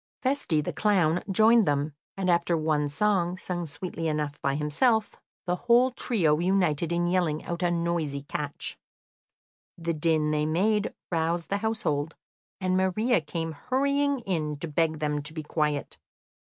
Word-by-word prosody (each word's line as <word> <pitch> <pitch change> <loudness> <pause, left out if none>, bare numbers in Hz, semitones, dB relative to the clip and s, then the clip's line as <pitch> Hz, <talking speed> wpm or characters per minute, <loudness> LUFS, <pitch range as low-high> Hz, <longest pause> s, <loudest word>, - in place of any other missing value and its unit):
Feste, 255 - +1
the - - -3
clown, 180 -6 +2
joined 220 +2 +5
them, 145 +1 0 0.2
and 190 -1 -1
after 170 -1 +2
one 155 -2 +1
song, 180 +2 +1
sung 175 -2 -3
sweetly 165 +2 -4
enough 150 -2 -2
by 140 0 0
himself, 210 - +1 0.3
the 180 0 0
whole 240 +4 +4
trio 175 - +1
united 175 -3 +1
in 170 0 +1
yelling 175 -4 0
out 170 +1 -4
a 175 - +2
noisy 170 -5 -1
catch. 145 0 -5 1.0
The 170 0 -2
din 155 -1 +1
they 150 0 +1
made 205 +6 +1 0.2
roused 165 0 0
the 200 - +1
household, 165 -9 -1 0.4
and 185 -1 0
Maria 190 +4 +2
came 165 +2 -4
hurrying 280 - 0
in 155 -8 -2
to 165 - -5
beg 160 +1 0
them 150 -1 -1
to 145 +2 -6
be 155 - -4
quiet. 150 -1 -2
170 Hz, 155 wpm, -27 LUFS, 150-195 Hz, 1.0 s, joined